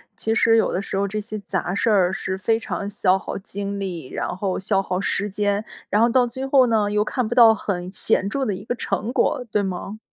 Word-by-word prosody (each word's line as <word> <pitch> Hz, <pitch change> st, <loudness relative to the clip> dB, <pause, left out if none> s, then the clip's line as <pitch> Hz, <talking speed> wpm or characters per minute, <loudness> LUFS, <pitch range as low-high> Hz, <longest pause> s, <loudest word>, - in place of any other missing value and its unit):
其 220 Hz, -, -1 dB
实 225 Hz, 0 st, +4 dB
有 225 Hz, -, +2 dB
的 185 Hz, -, -1 dB
时 195 Hz, -, -4 dB
候 200 Hz, -, +1 dB
这 210 Hz, +2 st, -3 dB
些 215 Hz, 0 st, -6 dB
杂 190 Hz, -2 st, -3 dB
事 225 Hz, -, +1 dB
儿 190 Hz, -4 st, +4 dB
是 190 Hz, 0 st, -3 dB
非 225 Hz, +4 st, +1 dB
常 200 Hz, -2 st, -4 dB
消 190 Hz, -2 st, +2 dB
耗 -, -, -5 dB
精 200 Hz, 0 st, -5 dB
力， 175 Hz, -8 st, -5 dB
然 -, -, -3 dB
后 190 Hz, -1 st, -1 dB
消 195 Hz, 0 st, +1 dB
耗 185 Hz, -1 st, -2 dB
时 205 Hz, +1 st, -1 dB
间， 205 Hz, +1 st, 0 dB, 0.3 s
然 210 Hz, -, +2 dB
后 235 Hz, -, +5 dB
到 250 Hz, +1 st, +4 dB
最 260 Hz, +3 st, -5 dB
后 265 Hz, -2 st, +5 dB
呢， 210 Hz, -3 st, +1 dB
又 210 Hz, 0 st, +2 dB
看 250 Hz, +1 st, -2 dB
不 240 Hz, -, -3 dB
到 230 Hz, -2 st, +8 dB
很 185 Hz, -3 st, -4 dB
显 195 Hz, 0 st, +1 dB
著 275 Hz, +3 st, -1 dB
的 205 Hz, -5 st, -1 dB
一 -, -, -9 dB
个 245 Hz, -, -2 dB
成 235 Hz, -1 st, -2 dB
果， 250 Hz, -1 st, +1 dB
对 210 Hz, -, +2 dB
吗？ 195 Hz, +2 st, -5 dB
205 Hz, 260 characters per minute, -22 LUFS, 190-225 Hz, 0.3 s, 到